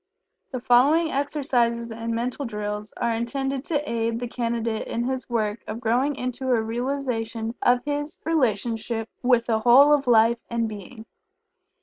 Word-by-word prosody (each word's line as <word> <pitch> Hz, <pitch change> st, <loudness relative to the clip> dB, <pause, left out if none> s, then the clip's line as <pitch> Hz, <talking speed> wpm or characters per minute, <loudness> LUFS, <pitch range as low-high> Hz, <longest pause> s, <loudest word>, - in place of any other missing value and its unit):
The 255 Hz, -, -4 dB
following 285 Hz, +8 st, +4 dB
exercises 250 Hz, -5 st, 0 dB
and 230 Hz, +1 st, -4 dB
Mental 250 Hz, +4 st, -2 dB
Drills 210 Hz, -2 st, -4 dB
are 235 Hz, -1 st, 0 dB
intended 270 Hz, +4 st, -2 dB
to 300 Hz, -4 st, -1 dB
aid 230 Hz, 0 st, -1 dB
the 245 Hz, -, -3 dB
Candidate 230 Hz, -2 st, -2 dB
in 235 Hz, -, -2 dB
his 260 Hz, +1 st, -3 dB
work 220 Hz, -2 st, -1 dB
of 225 Hz, -, -5 dB
growing 250 Hz, +5 st, +1 dB
into 255 Hz, +1 st, -4 dB
a 245 Hz, -2 st, +3 dB
realization 230 Hz, -2 st, -3 dB
of 245 Hz, +1 st, +3 dB
his 290 Hz, +1 st, -4 dB
relationship 230 Hz, -6 st, 0 dB
with 245 Hz, -2 st, +3 dB
the 225 Hz, -2 st, +1 dB
Whole 260 Hz, +6 st, +7 dB
of 280 Hz, -3 st, +1 dB
Life 230 Hz, 0 st, +5 dB
and 235 Hz, -1 st, 0 dB
Being. 220 Hz, +2 st, -9 dB
235 Hz, 150 wpm, -24 LUFS, 225-265 Hz, -, Whole